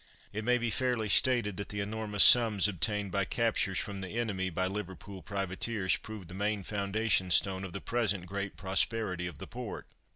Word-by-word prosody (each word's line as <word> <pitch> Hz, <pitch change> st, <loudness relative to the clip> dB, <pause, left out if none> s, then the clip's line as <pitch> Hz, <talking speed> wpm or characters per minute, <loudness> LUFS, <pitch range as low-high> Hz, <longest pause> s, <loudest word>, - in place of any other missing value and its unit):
It 110 Hz, +1 st, -4 dB
may 125 Hz, +2 st, +3 dB
be 120 Hz, -1 st, -2 dB
fairly 125 Hz, -4 st, -1 dB
stated 110 Hz, -3 st, +4 dB
that 100 Hz, -, -6 dB
the 105 Hz, -, -5 dB
enormous 105 Hz, 0 st, +2 dB
sums 110 Hz, -5 st, +7 dB
obtained 100 Hz, +2 st, -1 dB
by 100 Hz, +2 st, +1 dB
captures 100 Hz, -1 st, 0 dB
from 100 Hz, -1 st, -3 dB
the 95 Hz, +4 st, -6 dB
enemy 100 Hz, -5 st, -1 dB
by 95 Hz, +1 st, -1 dB
Liverpool 95 Hz, 0 st, -6 dB
privateers 100 Hz, 0 st, -1 dB
proved 105 Hz, -5 st, -9 dB
the 90 Hz, -, -11 dB
main 100 Hz, +1 st, -2 dB
foundation 100 Hz, -1 st, 0 dB
stone 95 Hz, +2 st, +3 dB
of 95 Hz, -, -6 dB
the 100 Hz, -, -6 dB
present 105 Hz, -6 st, -1 dB
great 100 Hz, +1 st, -5 dB
prosperity 95 Hz, -1 st, -1 dB
of 85 Hz, -5 st, -8 dB
the -, -, -8 dB
port. -, -, -7 dB
100 Hz, 185 wpm, -30 LUFS, 95-110 Hz, -, sums